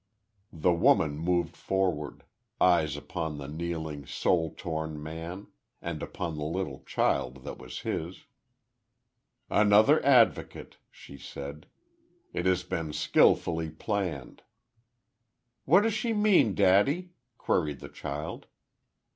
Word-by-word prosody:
The 85 Hz, +3 st, +2 dB
woman 75 Hz, -3 st, +3 dB
moved 85 Hz, 0 st, 0 dB
forward, 90 Hz, -6 st, -2 dB, 0.4 s
eyes 80 Hz, -5 st, +3 dB
upon 80 Hz, -1 st, -4 dB
the 70 Hz, -1 st, -7 dB
kneeling, 80 Hz, -2 st, -5 dB
soul 80 Hz, -3 st, +1 dB
torn 80 Hz, -2 st, -4 dB
man; 85 Hz, +5 st, -7 dB, 0.3 s
and 85 Hz, -3 st, -5 dB
upon 85 Hz, -4 st, -4 dB
the -, -, -3 dB
little 80 Hz, -3 st, -3 dB
child 65 Hz, +1 st, 0 dB
that 70 Hz, -, -7 dB
was -, -, -8 dB
his. 85 Hz, +3 st, -4 dB, 1.2 s
"Another 105 Hz, +8 st, +5 dB
advocate!" 125 Hz, -5 st, +2 dB
she 70 Hz, -, -13 dB
said. 70 Hz, +2 st, -8 dB, 0.7 s
"It 90 Hz, -, -1 dB
has 95 Hz, -1 st, +2 dB
been 80 Hz, -3 st, -4 dB
skilfully 80 Hz, +1 st, +2 dB
planned." 80 Hz, -, -4 dB, 1.2 s
"What 175 Hz, +8 st, +6 dB
does 225 Hz, 0 st, +1 dB
she 225 Hz, +2 st, -1 dB
mean, 210 Hz, -, +4 dB
daddy?" 105 Hz, -, +3 dB, 0.3 s
queried 75 Hz, -5 st, 0 dB
the -, -, -9 dB
child. 75 Hz, +3 st, -6 dB
85 Hz, 115 wpm, -28 LUFS, 75-95 Hz, 1.2 s, What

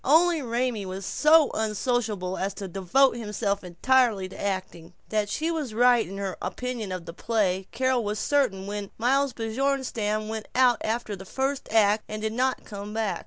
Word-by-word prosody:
Only 325 Hz, +3 st, +4 dB
Raymie 240 Hz, -4 st, -1 dB
was 190 Hz, +1 st, -5 dB
so 305 Hz, +4 st, +5 dB
unsociable 215 Hz, -3 st, -1 dB
as 195 Hz, +1 st, -2 dB
to 195 Hz, +1 st, -5 dB
devote 195 Hz, +9 st, +2 dB
himself 210 Hz, -3 st, -2 dB
entirely 210 Hz, +2 st, +2 dB
to -, -, -9 dB
acting. 185 Hz, -3 st, -4 dB, 0.2 s
That 210 Hz, -1 st, 0 dB
she 320 Hz, +9 st, -1 dB
was 295 Hz, -9 st, -3 dB
right 245 Hz, -1 st, +4 dB
in 195 Hz, -, -7 dB
her 195 Hz, -2 st, -3 dB
opinion 245 Hz, -5 st, -4 dB
of 180 Hz, -2 st, -5 dB
the 165 Hz, -, -8 dB
play 190 Hz, -3 st, 0 dB
Carol 260 Hz, -1 st, +1 dB
was 210 Hz, 0 st, -2 dB
certain 210 Hz, -9 st, +1 dB
when 205 Hz, 0 st, -5 dB
Miles 265 Hz, +3 st, +2 dB
Bjornstam 225 Hz, -3 st, -1 dB
went 220 Hz, -1 st, -5 dB
out 250 Hz, -2 st, +4 dB
after 220 Hz, -1 st, -2 dB
the 190 Hz, -, -10 dB
first 265 Hz, +5 st, -2 dB
act, 215 Hz, -1 st, +4 dB
and 215 Hz, -, -4 dB
did 220 Hz, 0 st, -2 dB
not 255 Hz, +2 st, 0 dB
come 205 Hz, +1 st, -7 dB
back. 220 Hz, -2 st, -1 dB
220 Hz, 175 wpm, -26 LUFS, 200-255 Hz, 0.2 s, so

